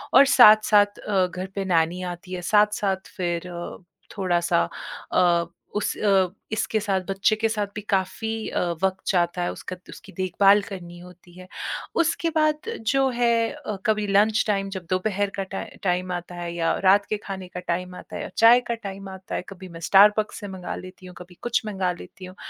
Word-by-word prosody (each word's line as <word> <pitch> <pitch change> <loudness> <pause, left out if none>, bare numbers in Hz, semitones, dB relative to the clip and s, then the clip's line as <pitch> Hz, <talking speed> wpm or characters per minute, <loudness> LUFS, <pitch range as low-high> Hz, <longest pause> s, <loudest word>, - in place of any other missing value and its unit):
और 275 - +9
साथ-साथ 210 -2 +7
अ, 195 -3 +1
घर 185 +1 -6
पे 195 -1 -2
नैनी 170 0 +1
आती 180 +1 -12
है। 180 - -4
साथ-साथ 210 -2 +1
फिर 175 -1 -2
अब 175 +1 -8 0.3
थोड़ा-सा 175 -3 +1 0.5
अ, 170 -1 +3 0.3
उस 210 - -1
अ, 195 -3 +3 0.2
इसके 220 0 0
साथ, 200 -2 0
बच्चे 195 +2 +2
के 225 +1 0
साथ 210 -2 -1
भी 210 - -4
काफ़ी 220 +3 -1
अ, - - -2 0.2
वक़्त 190 0 0
जाता 175 -1 +1
है। - - -1
उसका 185 - -7
उसकी 195 - -12
देखभाल 195 +2 +4
करनी 175 -3 -8
होती 180 0 -15
है। 185 - -11 0.6
उसके 330 +1 0
बाद 310 +5 +1 0.2
जो 270 0 +3
है 235 -1 +2
अ, 285 -8 -6
कभी 215 -1 +1
लंच 210 +2 +3
टाइम, 195 -2 0
जब 185 -2 -6
दोपहर 200 +2 0
का 195 - -2
टाइ 195 - -6
टाइम 180 0 0
आता 175 0 -6
है 175 -1 -5
या 165 -1 +1 0.2
रात 200 +1 +5
के 215 - 0
खाने 190 -2 -6
का 180 0 -7
टाइम 180 +1 -2
आता - - -10
है - - -4
या - - -6
चाय 230 +2 +7
का - - 0
टाइम 195 -1 -7
आता 190 0 -7
है, - - -1
कभी 190 -1 -10
मैं 165 -1 -10
स्टारबक्स 210 +2 +5
से 205 - -7
मँगा 180 - -5
लेती 185 0 -11
हूँ, 180 -1 -11
कभी 180 0 -12
कुछ 225 -2 0
मँगा 190 -3 -1
लेती 185 - -11
हूँ। 185 0 -11
195 Hz, 195 wpm, -24 LUFS, 180-210 Hz, 0.6 s, और